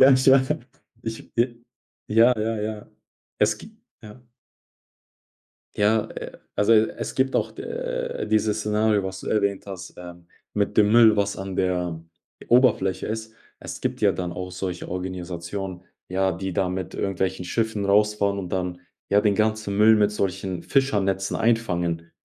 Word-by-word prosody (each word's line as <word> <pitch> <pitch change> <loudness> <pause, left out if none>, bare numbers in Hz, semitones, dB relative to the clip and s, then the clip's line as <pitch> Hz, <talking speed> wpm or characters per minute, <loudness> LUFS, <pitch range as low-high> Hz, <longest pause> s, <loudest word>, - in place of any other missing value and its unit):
Ja, 130 - +9
ich 130 0 +2
wa 135 +3 +4 0.4
Ich 115 0 -7
b 120 0 +1 0.5
ja, 115 +3 +5
ja, 110 0 -1
ja. 105 0 -4 0.5
Es 105 0 +3
gibt 215 - -13 0.3
ja? 110 +3 -12 1.5
Ja, 105 +1 +3
äh, - - -8 0.2
also 105 +2 +3
es 110 0 +1
gibt 130 0 +1
auch - - +1
de - - -4
dieses 110 0 +1
Szenario, 105 0 +2
was 95 0 -5
du - - -7
erwähnt 100 -2 0
hast, 95 -2 -8
äh, 90 -1 -9 0.4
mit 105 -1 0
dem 105 0 +5
Müll, 115 -2 +7
was 100 0 0
an 95 -1 -5
der 90 -3 0 0.5
Oberfläche 120 -6 +3
ist. 110 0 -5 0.2
Es - - -8
gibt - - -2
ja - - +5
dann 90 -1 -4
auch 90 +1 -5
solche 90 -1 -5
Organisationen, 90 0 -5 0.2
ja, 95 +1 +1
die 95 +2 -4
da 95 +1 0
mit 90 -1 -4
irgendwelchen 95 -1 -2
Schiffen 110 0 -1
rausfahren 100 0 +2
und 90 -3 -5
dann, 90 -1 -2 0.3
ja, 100 +1 +4
den 105 -2 +3
ganzen 110 -2 0
Müll 110 +1 +7
mit 105 -1 +3
solchen 95 -3 -2
Fischernetzen 100 -8 +1
einfangen. 85 -8 0
105 Hz, 155 wpm, -24 LUFS, 95-110 Hz, 1.5 s, Ja